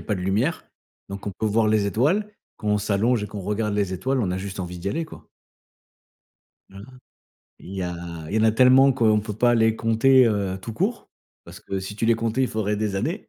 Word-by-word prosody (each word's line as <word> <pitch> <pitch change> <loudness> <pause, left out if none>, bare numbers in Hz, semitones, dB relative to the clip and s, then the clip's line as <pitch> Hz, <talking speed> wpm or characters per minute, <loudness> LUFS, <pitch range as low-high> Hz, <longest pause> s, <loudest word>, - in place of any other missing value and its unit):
a - - -10
pas 105 - -1
de - - -6
lumière, 105 - -1 0.4
donc 100 +1 -8
on - - -3
peut 110 - 0
voir 110 +1 +2
les 105 -1 +2
étoiles 155 - +1 0.3
quand - - -9
on 105 0 +2
s'allonge 105 +3 +1
et - - -3
qu'on 100 0 -7
regarde 105 +2 -2
les 100 -2 -1
étoiles, 130 +9 -1
on 95 -6 -1
a 95 - -2
juste 95 0 -6
envie 90 -1 -5
d'y 95 - -3
aller 165 +11 -2
quoi 160 - -14 1.4
voilà. 100 +1 -11 0.8
Il 95 - -10
y 95 - -3
a, 90 -1 -3 0.3
il 105 - -3
y - - +3
en - - +2
a 110 - +5
tellement 130 +4 +6
qu'on 110 -4 +3
peut 105 0 -6
pas 120 +3 +3
les 110 -1 +3
compter 120 +4 +4
heu 100 -4 -1
tout 115 +3 -7
court. - - -2 0.3
Parce - - -12
que 95 - -4
si 95 +2 -7
tu 110 - -1
les 115 - +4
comptais, 115 +3 -1
il 130 - +2
faudrait 105 -1 -2
des 105 -1 -2
années. 165 - -3
110 Hz, 235 wpm, -23 LUFS, 100-115 Hz, 1.4 s, tellement